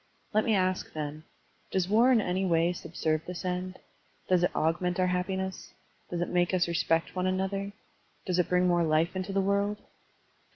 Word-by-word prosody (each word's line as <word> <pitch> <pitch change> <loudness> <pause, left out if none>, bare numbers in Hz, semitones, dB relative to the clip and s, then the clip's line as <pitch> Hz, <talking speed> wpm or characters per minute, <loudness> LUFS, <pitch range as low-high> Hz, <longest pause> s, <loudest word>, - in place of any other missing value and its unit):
Let 215 +1 +3
me 220 - +3
ask, 185 -1 0
then: 155 0 -5 0.4
Does 185 -2 0
war 230 +6 +5
in 235 -4 +5
any 185 0 -1
way 170 -1 +2
subserve 160 -2 -2
this 180 0 -6
end? 185 +1 -3 0.5
does 180 -2 +3
it 180 - +4
augment 175 +3 0
our 185 0 +3
happi 180 +1 -1
ness? 190 -1 -5 0.3
does 175 -1 -3
it 175 - -1
make 175 +1 +2
us 175 -1 +2
respect 165 0 0
one 185 0 0
another? 190 +2 -1 0.5
does 180 -2 0
it 180 - +1
bring 180 0 +3
more 175 -1 +3
life 160 +3 +1
into 185 +1 -3
the 195 0 +1
world? 200 +1 +1
180 Hz, 190 wpm, -29 LUFS, 175-190 Hz, 0.5 s, war